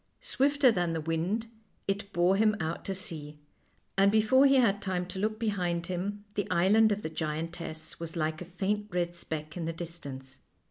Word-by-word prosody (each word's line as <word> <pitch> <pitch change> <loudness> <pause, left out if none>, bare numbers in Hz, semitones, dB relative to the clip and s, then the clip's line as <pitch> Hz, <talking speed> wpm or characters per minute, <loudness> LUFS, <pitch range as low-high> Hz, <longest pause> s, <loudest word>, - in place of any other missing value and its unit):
Swifter 280 -1 +3
than 175 -5 0
the 165 - -1
wind 165 +8 -1 0.4
it 200 0 -2
bore 175 +1 +3
him 215 +1 +4
out 160 0 -3
to 195 - -2
sea, 150 -5 -5 0.6
and 195 +1 +5
before 220 +6 +5
he 275 - +5
had 210 -6 +4
time 185 -2 -1
to 185 +1 -6
look 215 +2 0
behind 180 -6 -1
him 200 +4 -3
the 205 -2 -1
island 210 +5 +5
of 205 0 -1
the - - -1
giantess 160 0 -4
was 165 0 -6
like 155 0 -1
a - - -5
faint 200 +4 -2
red 175 -2 -1
speck 155 -2 -5
in 170 -2 -3
the 165 - -2
distance. 145 -6 -7
180 Hz, 185 wpm, -30 LUFS, 165-205 Hz, 0.6 s, and